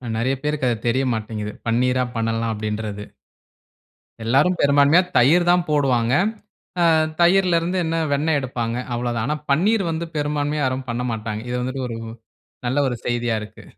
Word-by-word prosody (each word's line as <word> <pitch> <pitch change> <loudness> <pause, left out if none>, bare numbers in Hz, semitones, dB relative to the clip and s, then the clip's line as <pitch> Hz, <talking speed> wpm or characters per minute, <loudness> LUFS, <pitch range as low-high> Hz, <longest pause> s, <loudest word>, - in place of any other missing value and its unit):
நெறைய 130 +4 0
பேருக்கு 150 -2 -1
அது 115 - 0
தெரிய 130 +3 +2
மாட்டேங்கிது. 105 -1 -4 0.2
பன்னீரா 125 +2 +2
பண்ணலாம் 115 0 -1
அப்டின்றது. 105 -1 -4 1.2
எல்லாரும் 140 +10 +3
பெரும்பான்மையா 145 +4 +5 0.2
தயிர் 155 +9 +5
தான் 175 -1 +3
போடுவாங்க. 130 -5 +2 0.7
ஆ - - +5 0.4
தயிர்ல 175 0 +4
இருந்து 180 +3 -2
என்ன 165 +1 -1 0.2
வெண்ணெய் 150 +1 +1
எடுப்பாங்க 120 -3 -3 0.2
அவ்வளோ 120 0 -2
தான். 110 - -1
ஆனா 150 +2 -1
பன்னீர் 195 +8 +2
வந்து 165 +1 -3
பெரும்பான்மையா 145 0 -1
யாரும் 130 0 -2
பண்ணமாட்டாங்க. 115 -3 -3
இது 125 - -1
வந்துட்டு 130 +1 -3
ஒரு 115 -1 -5 0.7
நல்ல 130 +4 0
ஒரு 125 - -3
செய்தியா 120 -1 0
இருக்கு. 105 - -12
130 Hz, 150 wpm, -22 LUFS, 115-150 Hz, 1.2 s, பெரும்பான்மையா